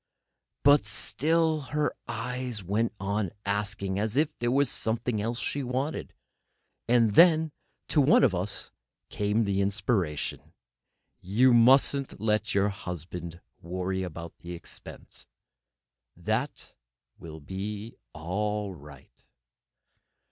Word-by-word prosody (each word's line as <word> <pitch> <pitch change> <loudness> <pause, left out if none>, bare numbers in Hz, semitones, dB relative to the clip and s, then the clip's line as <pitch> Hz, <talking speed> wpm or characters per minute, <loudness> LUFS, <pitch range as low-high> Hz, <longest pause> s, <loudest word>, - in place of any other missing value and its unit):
But 145 -2 +6
still 155 +9 +1 0.2
her 150 - +1
eyes 120 -1 -4
went 105 +5 0
on 100 0 -1 0.2
asking, 100 -1 -1
as 110 +4 -1
if 150 +1 +2
there 120 - 0
were 140 +3 +3
something 115 -2 -1
else 115 +2 -2
she 140 - -2
wanted. 130 +4 -2 0.8
And 115 -2 +4
then 160 - +6 0.4
to 150 - +4
one 140 +1 +5
of 125 -8 +4
us 95 +3 -3 0.4
came 105 +2 0
an 110 - 0
inspiration: 100 -4 -1 0.7
"You 120 +7 +4
mustn't 135 +3 +4
let 110 0 0
your 100 +1 +3
husband 90 -2 -6 0.2
worry 95 +2 -2
about 85 -2 -6
expense. 85 -1 -8 0.9
That - - -2 0.5
will 80 -2 -9
be 100 +7 -6 0.2
all 105 +4 -2
right." 70 -4 -15
105 Hz, 110 wpm, -28 LUFS, 95-125 Hz, 0.9 s, But